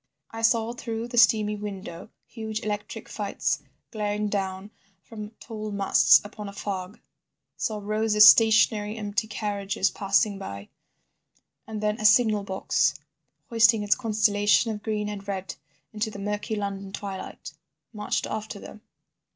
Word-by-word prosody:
I 225 - -6
saw 225 0 +2
through 230 -1 -5
the 240 - -5
steamy 215 -2 +4
window 200 -3 -7 0.2
huge 220 -1 -5
electric 210 -1 -5
lights - - -1 0.3
glaring 210 -1 -2
down 195 0 -3 0.3
from 215 -2 -8
tall 215 -2 -6
masts 200 -1 +5
upon 205 0 -8
a - - -10
fog, 195 +1 -5 0.6
saw 215 - -2
rows 215 +1 0
of 210 - +8
stationary 215 -1 +6
empty 210 +1 -2
carriages 200 -2 -1
passing 200 0 +1
by, 100 - -8 1.0
and 215 -1 -5
then 210 +1 -1
a - - -2
signal 215 -1 +5
box 190 -1 0 0.6
hoisting 225 -1 +5
its 205 0 +4
constellation 215 -1 +2
of 210 -1 -6
green 210 -1 -2
and 205 -1 -7
red 195 -1 -4 0.4
into 215 +1 -2
the 210 - -9
murky 205 +2 -3
London 200 -1 -4
twilight, 195 -1 -7 0.4
marched 210 -1 -2
after 215 -1 -5
them. 215 - -11
210 Hz, 140 wpm, -26 LUFS, 200-220 Hz, 1.0 s, of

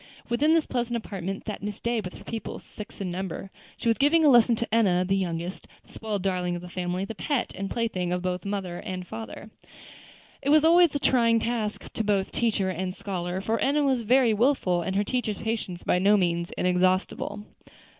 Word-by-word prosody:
Within 295 +7 +3
this 325 - +2
pleasant 240 -1 -1
apartment 195 -3 -5
sat 210 - -5
Miss 205 0 -5
Day 235 -1 0
with 180 -2 -8
her - - -12
pupils, 225 -1 -6
six 210 +1 -10
in 190 -3 -3
number. 190 +1 -5 0.3
She - - -4
was 230 +1 +2
giving 310 +3 +4
a - - +7
lesson 240 -2 +6
to 230 0 -4
Enna, 185 -6 +3
the 195 - +2
youngest, 175 -1 -3 0.2
the - - -21
spoiled 210 -4 -3
darling 180 -2 0
of 175 - -6
the 180 - -8
family, 180 +1 -2
the 225 - -6
pet 265 +4 -2
and 195 +1 -4
plaything 190 -7 -1
of 180 0 -1
both 180 -1 -1
father 195 -3 -4
and 185 -1 -5
mother. 110 - -7 0.9
It 280 - -2
was 305 +1 +6
always 340 -1 +6
a - - +1
trying 230 -4 +3
task 225 -2 -3
to 225 - -1
both 200 -2 0
teacher 210 -5 0
and 185 +1 -3
scholar, 180 -1 -3
for 225 +3 -1
Enna 290 +2 +2
was 265 -3 +2
very 240 +1 +4
wilful, 210 -7 +2
and 190 +3 -3
her 200 - +2
teacher's 220 -2 -2
patience 215 -5 -3
by 180 - +2
no 205 +3 +5
means 170 -2 0
inexhaustible. 185 +3 0
205 Hz, 205 wpm, -26 LUFS, 185-235 Hz, 0.9 s, a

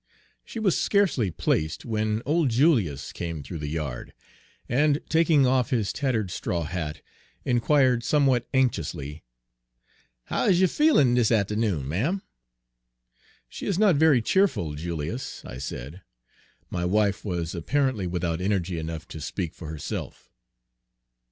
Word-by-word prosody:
She - - -9
was 210 -6 +1
scarcely 190 - +2
placed 80 -1 -1
whan 110 0 -1
old 155 -1 +2
Julius 115 - +2
came 85 -4 -5
through 80 +4 -7
the 75 - -4
yard, 75 -5 -5 0.5
and, 145 +3 +2
taking 160 -4 +4
off 125 -1 +2
his 115 -7 0
tattered 115 -9 -1
straw 85 -1 -2
hat, 80 -2 -4 0.4
inquired, 125 0 +3
somewhat 135 -5 +2
anxiously: 80 - -1 1.0
Page - - -22
134 - - 0
"How - - +1
is 180 -2 +4
you 185 - +5
feelin' 230 - +4
dis 120 -3 +3
atternoon, 105 - +1
ma'm?" 140 - -1 1.2
"She - - -7
is 195 - 0
not 200 -4 +5
very 145 -5 +4
cheerful, 180 - +1
Julius," 85 - -5
I 65 - -8
said. 70 +6 -6 0.7
My 85 - -2
wife 100 +2 +1
was 85 -5 -3
apparently 120 - 0
without 85 -1 -2
energy 95 -3 -1
enough 80 0 -5
to 80 - -8
speak 85 +2 -4
for 80 - -9
herself. 80 -2 -6
105 Hz, 140 wpm, -26 LUFS, 85-135 Hz, 1.2 s, you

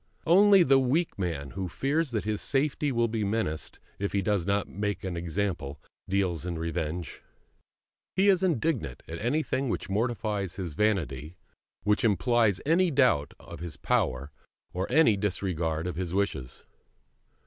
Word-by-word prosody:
Only 195 +2 +7
the 135 -3 +5
weak 135 - 0
man, 80 -7 -3
who 95 -1 -4
fears 145 - 0
that 115 -4 -2
his 105 -1 -2
safety 145 +1 0
will 120 -2 +2
be 110 -1 -2
menaced 100 -7 -2 0.2
if 100 0 -2
he 100 -1 +1
does 100 -2 0
not 100 0 +1
make 105 +2 -3
an 95 -2 -3
example, 85 -4 -3 0.3
deals 95 -4 0
in 85 -2 -3
revenge. 80 0 -4 0.9
He 190 +2 +3
is 190 -2 +5
indignant 155 - -1
at 80 - -6
anything 130 +2 0
which 95 - -3
mortifies 105 -3 -1
his 90 -5 -5
vanity, 85 -6 -1 0.5
which 105 0 +2
implies 115 -2 +3
any 170 +4 +3
doubt 130 - +2
of - - -10
his 85 -3 -7
power 70 +3 0 0.4
or 90 +5 -3
any 145 -6 +5
disregard 90 -5 -1
of 90 -2 -4
his 90 -1 -3
wishes. 80 -11 -2
100 Hz, 150 wpm, -28 LUFS, 85-125 Hz, 0.9 s, Only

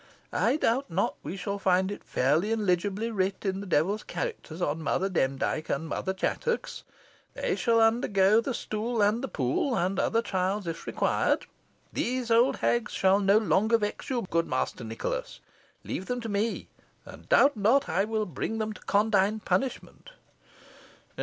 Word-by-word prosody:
I - - +2
doubt 265 -1 +1
not 175 +3 0
we 190 - -6
shall 200 +2 -3
find 190 0 +2
it 205 - -7
fairly 155 - +1
and 220 -2 0
legibly 200 +5 0
writ 195 -1 -1
in 190 0 -1
the 200 - -7
devil's 185 +6 +1
characters 445 - -5
on 160 -2 -1
Mother 190 +4 0
Demdike 135 -1 -1
and 160 +4 -1
Mother 190 - -2
Chattox. 470 - -2 0.5
They - - -1
shall 230 -2 +2
undergo 220 -2 +4
the 255 +1 -3
stool 220 +1 -1
and 215 +5 +2
the - - -1
pool, 150 - 0
and 185 +3 0
other 230 0 +1
trials, 190 0 -1
if 165 0 -6
required. - - +1 0.5
These 250 -1 -1
old 245 +4 +4
hags 240 0 0
shall 190 +1 +3
no 200 +1 +4
longer 220 +1 +3
vex 210 -2 -4
you, 250 -3 -1
good 165 -1 0
Master - - -2
Nicholas. - - -4 0.4
Leave 190 - -5
them 250 0 -2
to 230 - -5
me, 210 +3 -1 0.4
and - - -13
doubt 290 - +5
not 225 +7 +3
I 180 +5 +1
will 215 0 -1
bring 205 +6 -4
them 220 -1 -2
to - - -14
condign 210 0 +2
punishment." 270 - -3
205 Hz, 165 wpm, -28 LUFS, 190-230 Hz, 0.5 s, doubt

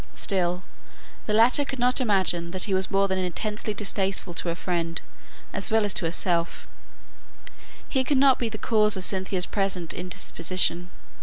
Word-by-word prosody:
Still, 180 -2 -1 0.6
the 210 - 0
latter 240 +6 +5
could 270 -1 -5
not 250 +1 +2
imagine 190 -6 +1
that 185 +1 +1
he 200 - -1
was 190 0 +1
more 195 -1 +2
than 190 -1 -1
intensely 210 +4 -3
distasteful 195 -3 -2
to 170 - -3
her 170 - -1
friend, 170 -1 -2 0.5
as - - +2
well 220 -1 +2
as 205 - +3
to - - 0
herself; 170 0 0 1.2
he 265 -2 0
could 280 +1 +1
not 270 -1 +5
be 235 - -1
the 215 - -6
cause 210 -2 +2
of 185 - -1
Cynthia's 190 -1 0
present 195 -4 -2
indisposition. 180 0 -1
190 Hz, 165 wpm, -25 LUFS, 180-215 Hz, 1.2 s, latter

